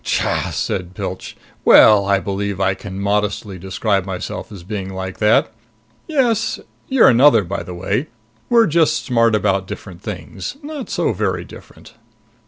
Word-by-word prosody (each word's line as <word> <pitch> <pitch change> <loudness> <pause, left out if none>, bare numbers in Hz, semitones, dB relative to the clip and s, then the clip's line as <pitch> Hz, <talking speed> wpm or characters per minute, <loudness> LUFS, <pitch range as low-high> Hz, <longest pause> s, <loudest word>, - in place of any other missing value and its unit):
"Tcha!" - - -1
said 90 -1 -3
Pilch. - - -6 0.3
"Well, 100 -2 +7
I 100 0 +3
believe 100 0 -3
I 95 -1 +2
can 95 0 -8
modestly 100 -1 -1
describe 95 +2 -1
myself 95 +4 -6
as 95 -4 -10
being 95 0 -5
like 95 0 -6
that. 105 +1 +3 0.6
Yes. 240 -8 +1 0.3
You're 265 -3 +5
another, 125 -2 +5
by 95 +3 -4
the 90 - -8
way. 100 - -2 0.4
We're 235 -1 +5
just 165 -2 +1
smart 115 -3 +3
about 95 -3 0
different 95 -3 -9
things. 95 - -7
Not 290 -3 -7
so - - 0
very - - -2
different." - - -15
100 Hz, 150 wpm, -19 LUFS, 95-120 Hz, 0.6 s, Well